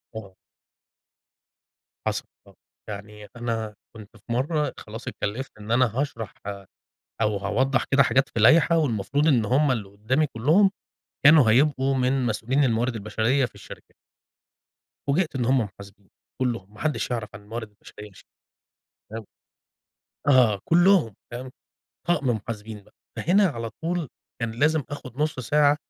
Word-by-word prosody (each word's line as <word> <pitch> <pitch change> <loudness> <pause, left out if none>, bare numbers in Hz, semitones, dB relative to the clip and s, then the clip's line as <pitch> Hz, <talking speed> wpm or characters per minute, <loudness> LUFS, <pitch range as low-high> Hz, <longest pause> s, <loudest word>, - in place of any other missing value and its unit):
آه. 100 -4 -8 1.7
حصل - - -1 0.2
آه. - - -18 0.3
يعني 105 0 -8
أنا 115 -2 -3 0.2
كنت 110 +1 -13
في 115 +3 -6
مرة 150 +5 0
خلاص 110 +2 -9
اتكلفت 120 +7 -4
إن 105 +2 -7
أنا 125 +2 +5
هاشرح 115 -7 -3 0.9
أو 105 -1 +1
هاوضح 120 +6 +1
كده 140 +1 +7
حاجات 135 0 +2
في 115 - -3
لايحة 165 +8 +6
والمفروض 140 +1 0
إن 125 -7 +4
هُم 135 +5 +3
اللي 105 -5 -3
قدامي 110 +10 0
كلهم 155 - +3 0.6
كانوا 150 -7 +8
هيبقوا 135 +1 +3
من 130 0 +1
مسؤولين 120 +5 +1
الموارد 120 0 +1
البشرية 110 +5 +1
في - - -11
الشركة. - - -13 1.1
فوجئت 155 +1 +1
إن 125 - 0
هم 130 +3 +3
محاسبين 100 -1 -10 0.3
كلهم، 115 -6 -2
ما 105 - -15
حدش 150 -4 -1
يعرف 115 -3 -2
عن 100 - -10
الموارد 110 +1 -6
البشرية 105 0 -13
شئ 95 - -17 0.9
تمام، 110 0 -6 1.0
آه، 125 -8 +5
كلّهم 175 - +4 0.2
تمام، 125 +2 -6 0.6
طقم 145 -7 +2
محاسبين 110 -1 -5
بقى، - - -24 0.2
فهنا 195 +3 +3
على 115 -7 -4
طول 170 -2 -2 0.3
كان 115 -1 -1
لازم 150 +6 +2
آخد 130 -4 -8
نُصّ 150 -3 0
ساعة 145 +4 +3
120 Hz, 140 wpm, -25 LUFS, 110-145 Hz, 1.7 s, كانوا